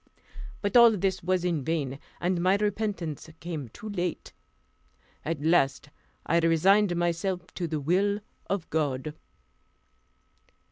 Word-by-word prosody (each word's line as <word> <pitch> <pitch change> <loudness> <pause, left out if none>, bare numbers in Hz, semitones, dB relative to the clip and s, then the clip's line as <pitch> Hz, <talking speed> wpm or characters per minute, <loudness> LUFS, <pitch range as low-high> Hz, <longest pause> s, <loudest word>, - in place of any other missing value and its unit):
But 205 +4 -1
all 235 -3 +8
this 190 0 0
was 180 0 0
in 165 -6 0
vain, 140 -3 -2 0.2
and 175 0 0
my 185 +2 +4
repentance 205 -7 -2
came 160 -7 -5
too 215 - -10
late. 180 -4 -3 0.9
At 150 -1 -3
last 150 -3 +2 0.3
I 170 +2 +3
resigned 175 +4 +4
myself 175 +1 -1
to 175 - -3
the 155 -1 -2
will 195 +7 +1 0.3
of 195 -4 -2
God. 150 -2 -1
175 Hz, 125 wpm, -28 LUFS, 160-195 Hz, 0.9 s, all